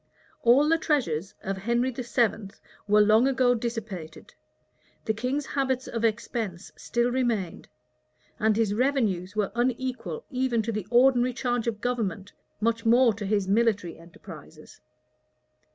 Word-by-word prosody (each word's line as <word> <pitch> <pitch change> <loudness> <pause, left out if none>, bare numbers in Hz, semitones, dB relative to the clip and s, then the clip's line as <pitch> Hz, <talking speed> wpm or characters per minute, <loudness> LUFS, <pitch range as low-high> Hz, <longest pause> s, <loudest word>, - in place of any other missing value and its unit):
All 255 +5 +5
the 330 +1 +3
treasures 200 - -1
of 195 0 -3
Henry 235 +6 0
VII. 235 -4 -1 0.4
were 210 +1 +5
long 215 +4 +5
ago 255 -2 +3
dissipated; 220 -9 -6 0.7
the 220 - +1
king's 255 +6 -2
habits 265 -2 -1
of 230 -1 -4
expense 220 -4 -2
still 240 0 -1
remained; 235 -8 -2 0.7
and 215 0 +2
his 220 -3 +1
revenues 215 -7 0
were 210 -2 0
unequal 255 - -2
even 250 -3 0
to 230 - -2
the 215 -3 -4
ordinary 250 0 +4
charge 245 -2 -2
of 220 -2 -3
government, 220 -6 -3 0.3
much 230 +1 0
more 235 0 +5
to 205 -1 -6
his 200 -2 0
military 205 -5 +1
enterprises. 160 -2 -14
230 Hz, 135 wpm, -26 LUFS, 205-250 Hz, 0.7 s, All